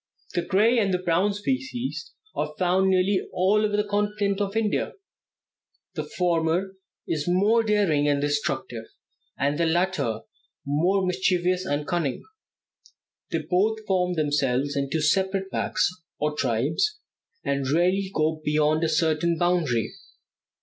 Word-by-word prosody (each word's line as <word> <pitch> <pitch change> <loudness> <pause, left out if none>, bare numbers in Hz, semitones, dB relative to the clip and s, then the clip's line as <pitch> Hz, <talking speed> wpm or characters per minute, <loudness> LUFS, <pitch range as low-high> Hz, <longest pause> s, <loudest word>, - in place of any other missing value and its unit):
The 175 - +1
gray 215 +7 +3
and 200 -3 +1
the 180 - +2
brown 180 +3 +1
species 260 - -3 0.2
are 150 0 -3
found 185 +1 +2
nearly 190 +1 +2
all 200 +4 +2
over 210 -1 +1
the 210 - +2
continent 205 -1 -1
of 200 +1 -1
India; 215 -2 0 1.0
the - - -3
former 175 +2 0 0.3
is 150 -1 -2
more 200 +6 +3
daring 200 -10 +2
and 145 -1 +2
destructive, 135 -5 -2 0.5
and 145 +2 0
the 170 - +2
latter 160 -10 0 0.4
more 175 +7 +1
mischievous 180 0 +1
and 145 -1 -1
cunning. 170 -7 -1 1.1
They 160 -1 -2
both 215 +5 +1
form 180 -2 +1
themselves 145 -2 0
into 140 +3 -1
separate 190 +4 +1
packs, - - +1 0.3
or 150 0 -1
tribes, 150 - 0 0.5
and 140 -2 -1
rarely 185 +5 +2
go 155 -3 0
beyond 150 +1 +2
a 165 - +2
certain 160 +1 +1
boundary. 160 -10 +1
175 Hz, 130 wpm, -25 LUFS, 150-195 Hz, 1.1 s, gray